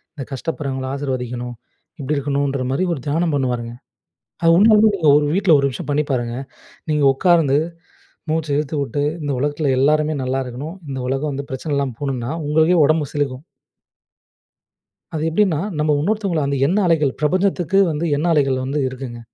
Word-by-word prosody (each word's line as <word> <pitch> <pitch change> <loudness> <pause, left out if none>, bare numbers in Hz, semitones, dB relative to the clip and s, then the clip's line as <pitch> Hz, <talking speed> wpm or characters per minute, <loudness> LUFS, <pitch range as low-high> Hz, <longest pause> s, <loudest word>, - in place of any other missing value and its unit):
இந்த 140 - -5
கஷ்டப்படுறவங்கள 135 -2 -4
ஆசிர்வதிக்கணும். 125 -3 -4 0.4
இப்படி 145 +2 -1
இருக்கணுன்ற 140 -1 -1
மாரி 135 +7 0
ஒரு 145 - -5
தியானம் 160 +2 0
பண்ணுவாருங்க. 120 -3 -2 0.7
அது 165 - +6
உண்மையிலயே 215 +2 +6
நீங்க 160 -6 +2
ஒரு 150 - +1
வீட்டில 190 -4 +4
1 140 - +1
நிமிஷம் 130 - -7
பண்ணி 150 +1 +2
பாருங்க. 120 -2 -1 0.6
நீங்க 150 -1 +2
உட்கார்ந்து 160 -3 +3 0.7
மூச்ச 160 -1 -1
இழுத்து 150 +1 -2
வுட்டு, 140 0 -2 0.2
இந்த 145 - -1
உலகத்தில 145 +1 0
எல்லாருமே 150 +3 +2
நல்லா 130 +1 -1
இருக்கணும். 140 +8 -7
இந்த 135 - -4
உலகம் 135 +3 -1
வந்து 140 +1 -5
பிரச்சன 140 +3 -3
இல்லாம 140 -3 -1
போணும்னா, 135 -4 -3 0.2
உங்களுக்கே 160 +4 +3
உடம்பு 155 -1 +1
சிலிர்க்கும். 140 -2 -2 1.7
அது 155 - -2
எப்டின்னா, 180 -1 +2 0.2
நம்ம 150 0 +2
இன்னொருத்தவங்கள 195 -3 0
அந்த 140 - -1
எண்ண 185 +6 +1
அலைகள் 150 -5 +2
பிரபஞ்சத்துக்கு 185 +3 +1
வந்து 155 +1 -2
எண்ண 150 +4 -1
அலைகள் 135 -4 +2
வந்து 140 +3 -2
இருக்குங்க. 130 -2 -7
145 Hz, 155 wpm, -20 LUFS, 135-160 Hz, 1.7 s, அது